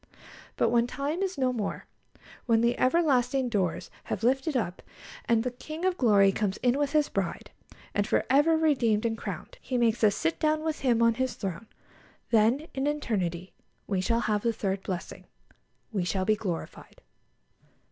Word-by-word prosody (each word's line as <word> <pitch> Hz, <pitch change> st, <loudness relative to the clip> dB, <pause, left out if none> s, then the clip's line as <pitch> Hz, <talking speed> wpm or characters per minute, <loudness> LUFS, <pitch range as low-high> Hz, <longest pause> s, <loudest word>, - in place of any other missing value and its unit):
But -, -, +3 dB
when 235 Hz, 0 st, +2 dB
time 285 Hz, +7 st, -3 dB
is 380 Hz, -4 st, -2 dB
no 255 Hz, -2 st, +1 dB
more, 215 Hz, -4 st, -4 dB, 0.6 s
when 225 Hz, -1 st, +4 dB
the 235 Hz, +1 st, +2 dB
ever 335 Hz, +7 st, +3 dB
lasting 255 Hz, -3 st, +1 dB
doors 185 Hz, -5 st, -1 dB
have -, -, -4 dB
lifted 265 Hz, +4 st, +1 dB
up, 180 Hz, -6 st, -3 dB, 0.4 s
and 230 Hz, -1 st, +2 dB
the 250 Hz, -, -2 dB
King 310 Hz, +7 st, -6 dB
of 375 Hz, -1 st, +2 dB
Glory 205 Hz, -, +4 dB
comes 195 Hz, -1 st, -1 dB
in 250 Hz, +2 st, +2 dB
with 290 Hz, 0 st, 0 dB
His 300 Hz, -1 st, +3 dB
Bride, -, -, -3 dB, 0.4 s
and, 205 Hz, 0 st, 0 dB
for -, -, +1 dB
ever 295 Hz, +5 st, +4 dB
redeemed 240 Hz, -9 st, +2 dB
and 225 Hz, -1 st, 0 dB
crowned, -, -, -7 dB
He 255 Hz, -, -2 dB
makes 235 Hz, -1 st, +1 dB
us 205 Hz, -2 st, +5 dB
to -, -, -5 dB
sit 160 Hz, -, -1 dB
down 310 Hz, 0 st, +1 dB
with 315 Hz, -1 st, -2 dB
Him 240 Hz, -4 st, +2 dB
on 230 Hz, 0 st, +5 dB
His 260 Hz, +2 st, -2 dB
throne, 195 Hz, +2 st, -5 dB, 0.6 s
then 230 Hz, +7 st, +3 dB
in 270 Hz, +1 st, -1 dB
eternity 190 Hz, -, -2 dB, 0.3 s
we 195 Hz, -3 st, -1 dB
shall 230 Hz, +4 st, +1 dB
have 210 Hz, -2 st, 0 dB
the 235 Hz, -, +1 dB
third 195 Hz, -3 st, -2 dB
blessing 185 Hz, -2 st, -6 dB, 0.7 s
we 200 Hz, -5 st, -1 dB
shall 185 Hz, +1 st, -1 dB
be 215 Hz, -, +3 dB
glorified. 185 Hz, -6 st, -6 dB
235 Hz, 180 wpm, -28 LUFS, 205-275 Hz, 0.7 s, us